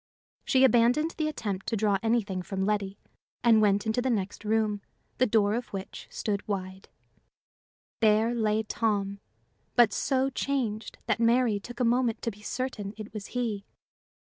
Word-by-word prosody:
She 260 0 +4
abandoned 250 +6 +4
the 310 -2 -2
attempt 205 -10 -4
to 225 - 0
draw 205 -1 +2
anything 220 -5 0
from 190 +1 -3
Letty, 200 -1 -1 0.5
and 225 -2 +6
went 205 0 +3
into 220 +3 +1
the 260 - 0
next 205 -3 -2
room, 215 -1 +1 0.4
the 255 - +4
door 210 -2 +3
of 240 +1 -2
which 195 -1 -7
stood 200 -2 -3
wide. 190 -1 -4 1.1
There 220 +1 +3
lay 220 -2 +1
Tom, 205 -3 -1 0.6
but 235 -4 +5
so 270 0 +1
changed 245 -6 -2
that - - 0
Mary 235 -2 +3
took 240 +4 -10
a 250 - +2
moment 240 -1 +1
to 230 - -1
be 205 0 -16
certain 215 -4 -4
it 215 -1 -8
was 215 -1 -6
he. 220 -5 -1
220 Hz, 160 wpm, -28 LUFS, 205-240 Hz, 1.1 s, and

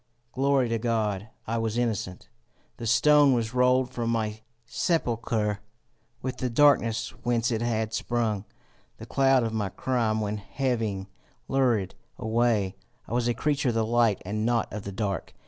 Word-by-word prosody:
Glory 135 -1 +2
to 115 0 -1
God! 110 -3 -1 0.2
I 115 +1 -1
was 115 0 -1
innocent! 110 -6 -2 0.5
The 115 - -5
stone 145 +4 +5
was 115 -1 -1
rolled 125 0 +3
from 120 -2 -2
my 110 -2 -1 0.2
sepulchre. 115 - 0 0.6
With 130 -1 -3
the 125 - -2
darkness 120 -3 +3
whence 120 0 +1
it 115 -1 -1
had 110 -2 -1
sprung, 110 -3 -1 0.5
the - - -9
cloud 135 -2 +3
of 115 -1 -2
my 105 -3 -1
crime 115 0 0
went 105 0 -2
heaving 110 -3 -2 0.4
lurid 120 -8 +1 0.2
away. 110 -4 +1 0.3
I - - -6
was 120 0 +1
a 120 - +1
creature 150 -2 0
of 115 - -1
the 110 -1 +2
light 115 -2 +2
and 105 +3 -2
not 115 -3 0
of 105 -1 -6
the 100 - -4
dark. 100 -1 -3
115 Hz, 160 wpm, -27 LUFS, 110-125 Hz, 0.6 s, stone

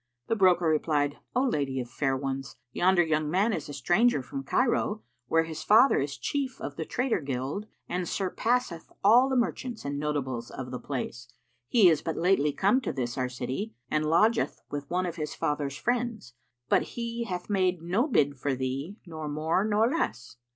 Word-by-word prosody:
The 225 - +2
broker 180 -4 +4
replied, 150 -2 +1 0.2
"O 255 - +3
lady 140 - 0
of 125 - -4
fair 135 +2 -1
ones, 135 -1 -4 0.2
yonder 180 +4 +4
young 155 -2 0
man 200 +7 +2
is 155 -5 -4
a - - -6
stranger 175 - +2
from 135 +1 -5
Cairo, 220 - +1 0.2
where 165 +3 +3
his 160 -1 -6
father 230 +6 +6
is 140 -1 -3
chief 260 - -2
of 145 - -5
the 160 - -4
trader 250 +2 0
guild 140 +9 -3 0.2
and 180 -1 -2
surpasseth 195 -2 -1
all 240 +6 +6
the 265 - 0
merchants 245 - -2
and 140 0 -2
notables 135 -5 -2
of 125 -1 -7
the 125 - -4
place. 120 -3 -5 0.4
He 215 - +6
is 160 -3 +4
but 165 - -3
lately 165 -4 +3
come 200 - +2
to - - -2
this 120 -3 -3
our 130 -1 -1
city 130 - -4 0.2
and 155 0 +2
lodgeth 215 +9 +2
with 145 -1 -5
one 180 +1 0
of 170 -1 -4
his 150 -2 -4
father's 145 -1 -2
friends; 235 - -2 0.3
but - - +4 0.2
he 235 0 -3
hath 180 -4 -4
made 185 -4 +1
no 195 - +1
bid 145 - +2
for 135 +1 0
thee 135 - -3
nor 155 -3 -6
more 155 +5 +1
nor 215 +1 +3
less." 180 - -2
165 Hz, 185 wpm, -28 LUFS, 140-215 Hz, 0.4 s, father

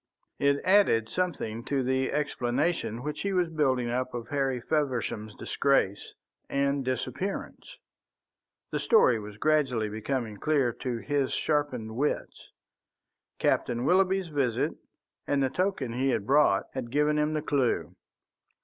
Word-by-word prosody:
It 140 0 +2
added 185 - +4
something 120 -10 -2
to 140 -2 0
the 130 +1 0
explanation 140 -2 -1
which 150 +1 -4
he 200 0 -1
was 180 -2 +1
building 135 -6 +1
up 125 0 -2
of 120 -1 -6
Harry 135 -3 0
Feversham's 120 -6 -2
disgrace 135 -8 0 0.3
and 140 0 0
disappearance. 130 - -4 0.9
The - - -1
story 130 - +4
was 105 -1 -9
gradually 130 -7 +1
becoming 110 0 -3
clear 140 -2 +1
to 125 0 -4
his 140 +2 -1
sharpened 130 -8 -1
wits. 145 +5 -2 0.9
Captain 120 +1 0
Willoughby's 190 +1 +3
visit 135 -6 0 0.6
and 140 -1 +2
the 130 - 0
token 180 -9 -1
he 130 +3 0
had 110 -6 0
brought 145 +5 +4
had 130 -3 -4
given 150 +3 +2
him 150 +1 +1
the 155 -1 -2
clue. 140 -5 0
135 Hz, 130 wpm, -28 LUFS, 120-150 Hz, 0.9 s, added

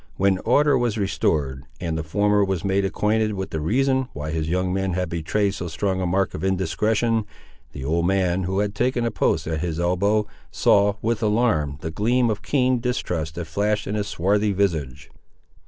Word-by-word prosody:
When 95 -1 +2
order 145 +7 +3
was 120 -3 0
restored, 75 -9 -1 0.2
and 85 -3 -2
the 80 - -1
former 100 +6 +2
was 95 -3 -2
made 100 0 +1
acquainted 105 +2 0
with 95 0 -4
the 80 - -2
reason 130 - +1
why 75 +1 -5
his 80 0 -2
young 90 +1 0
men 95 -1 -1
had 90 -1 -1
betrayed 95 +5 0
so 90 - -5
strong 95 +3 -1
a 90 - 0
mark 95 +2 0
of - - -6
indiscretion, 105 +5 +1 0.5
the 65 -2 -7
old 85 +3 +1
man, 95 -1 +1
who 95 +2 0
had 105 -1 -1
taken 120 +2 0
a 115 - 0
post - - 0
at 80 -1 -2
his 85 0 -3
elbow, 100 +5 +1 0.2
saw, 100 0 +3
with 115 0 0
alarm, 105 - +1
the 80 - -4
gleam 120 +6 +2
of 105 -1 -3
keen 130 +1 +1
distrust 90 -10 -2
that 85 - -4
flashed 105 +6 -1
in 100 - -3
his 105 -1 -1
swarthy 100 +3 +1
visage. 75 -9 -2
95 Hz, 190 wpm, -23 LUFS, 85-105 Hz, 0.5 s, order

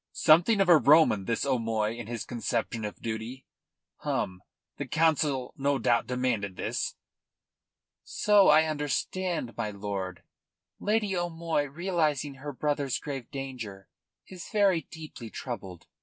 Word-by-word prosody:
"Something 175 +7 +5
of 195 - +3
a 175 -2 +8
Roman 140 -7 +5
this 115 +5 -1
O'Moy 115 -4 0
in 120 -2 -7
his 115 -1 -4
conception 115 -2 -2
of 105 - -7
duty! 115 +3 -5 0.5
Hum! 90 0 -2 0.4
The - - -4
Council 150 -5 +1
no 140 0 +1
doubt 115 -1 +2
demanded 125 -6 -1
this?" - - -2 1.1
"So 205 -2 +4
I 155 +1 +7
understand, 155 - -2
my 110 -2 -2
lord. 100 -3 -5 0.6
Lady 210 -2 0
O'Moy, 165 -3 -1
realising 150 -3 -1
her 145 0 -4
brother's 145 -1 -1
grave 135 -4 -6
danger, 125 -8 -7 0.4
is 185 -3 -10
very 200 -5 +3
deeply 155 -8 -9
troubled." 100 -8 -7
135 Hz, 125 wpm, -28 LUFS, 115-160 Hz, 1.1 s, a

